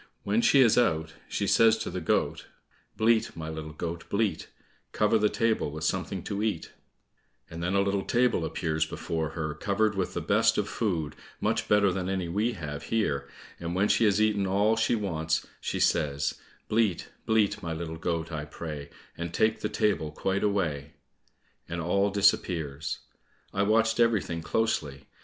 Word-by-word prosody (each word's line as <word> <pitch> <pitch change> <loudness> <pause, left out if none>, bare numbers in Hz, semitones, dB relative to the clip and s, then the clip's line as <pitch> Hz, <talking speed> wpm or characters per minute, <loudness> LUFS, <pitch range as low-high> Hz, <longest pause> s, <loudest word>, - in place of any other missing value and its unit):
When 105 +3 +2
she 125 +4 +5
is 120 -2 +5
out, 80 -8 +1 0.2
she - - -1
says 115 -1 +5
to 110 - -4
the - - -4
goat, - - 0 0.5
"Bleat, 110 -4 +2
my 80 -1 -5
little 80 -1 -6
goat, 85 +2 -5
bleat, 105 0 0 0.5
Cover 110 +1 +3
the 105 0 +3
table 115 -9 +1
with 75 +2 -7
something 90 +2 -2
to 100 -1 -3
eat," 105 -6 -2 0.8
and 85 +1 -6
then 90 +3 0
a 100 - +4
little 100 0 0
table 120 -7 +2
appears 80 -1 -1
before 80 0 -3
her 75 -2 -2
covered 105 +7 0
with 95 -2 -2
the - - 0
best - - +3
of - - 0
food, 80 -9 -2 0.2
much - - 0
better 105 -2 +4
than 95 0 -2
any 95 -2 -1
we 105 +8 0
have 75 -7 -6
here, 105 -12 -1 0.3
and 85 +1 -4
when 100 +3 +3
she 115 - +3
has 105 -1 +3
eaten 105 -2 +2
all 100 +4 +3
she 115 +1 +2
wants, 80 -7 -1
she - - -3
says, 70 -1 +1 0.3
"Bleat, 105 -5 +1 0.2
bleat, 110 -3 +2
my 85 - -4
little 80 0 -4
goat, 80 0 -2
I 75 -2 -4
pray, 75 -2 -7 0.3
And 85 0 -5
take 110 +5 +2
the - - -2
table 100 -8 0
quite 95 +5 -1
away," 80 -8 -1 0.8
and 85 0 -3
all 100 +4 +1
disappears. 85 -7 +1 0.6
I 95 - 0
watched 110 +2 +2
everything 110 -8 +2
closely. 80 -8 -1
95 Hz, 170 wpm, -28 LUFS, 80-105 Hz, 0.8 s, she